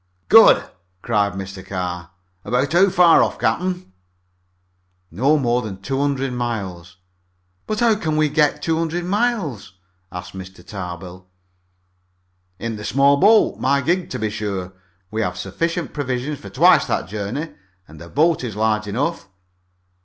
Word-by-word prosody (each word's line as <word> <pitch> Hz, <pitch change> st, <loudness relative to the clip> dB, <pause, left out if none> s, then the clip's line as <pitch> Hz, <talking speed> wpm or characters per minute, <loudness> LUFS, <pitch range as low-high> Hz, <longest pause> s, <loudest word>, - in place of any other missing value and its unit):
"Good!" -, -, +7 dB, 0.4 s
cried 105 Hz, -3 st, +1 dB
Mr. 95 Hz, 0 st, -7 dB
Carr. 90 Hz, -2 st, -5 dB, 0.3 s
"About 125 Hz, +7 st, 0 dB
how 190 Hz, +3 st, +5 dB
far 175 Hz, -2 st, +6 dB
off, -, -, 0 dB
captain?" 180 Hz, -, -2 dB, 1.2 s
"Not 135 Hz, -, +2 dB
more 120 Hz, -1 st, +1 dB
than 100 Hz, -5 st, -7 dB
two 135 Hz, +7 st, -3 dB
hundred 135 Hz, -2 st, -1 dB
miles." 95 Hz, -8 st, -5 dB, 0.7 s
"But 215 Hz, +1 st, -2 dB
how 235 Hz, -2 st, +5 dB
can 160 Hz, -7 st, -2 dB
we 155 Hz, 0 st, +3 dB
go 150 Hz, 0 st, +3 dB
two 160 Hz, -1 st, -1 dB
hundred 165 Hz, +1 st, -2 dB
miles?" 185 Hz, -, -1 dB, 0.4 s
asked 90 Hz, 0 st, -8 dB
Mr. 95 Hz, 0 st, -10 dB
Tarbill. 90 Hz, -1 st, -8 dB, 1.3 s
"In 115 Hz, +2 st, -4 dB
the 105 Hz, -, -8 dB
small 140 Hz, +4 st, +3 dB
boat 210 Hz, +6 st, +4 dB
my 140 Hz, +2 st, +2 dB
gig 175 Hz, +5 st, 0 dB
to -, -, -4 dB
be 110 Hz, -1 st, -2 dB
sure. 100 Hz, -4 st, -4 dB, 0.4 s
We 110 Hz, +1 st, -2 dB
have 90 Hz, -4 st, -2 dB
sufficient 165 Hz, -, -3 dB
provisions 135 Hz, 0 st, -3 dB
for 100 Hz, -, -10 dB
twice 100 Hz, -, +4 dB
that -, -, -1 dB
journey, 110 Hz, +10 st, -4 dB, 0.4 s
and 75 Hz, 0 st, -14 dB
the 85 Hz, -, -10 dB
boat 160 Hz, -, +2 dB
is 115 Hz, -5 st, -5 dB
large 110 Hz, 0 st, 0 dB
enough." 135 Hz, +4 st, -2 dB
120 Hz, 145 wpm, -21 LUFS, 95-155 Hz, 1.3 s, Good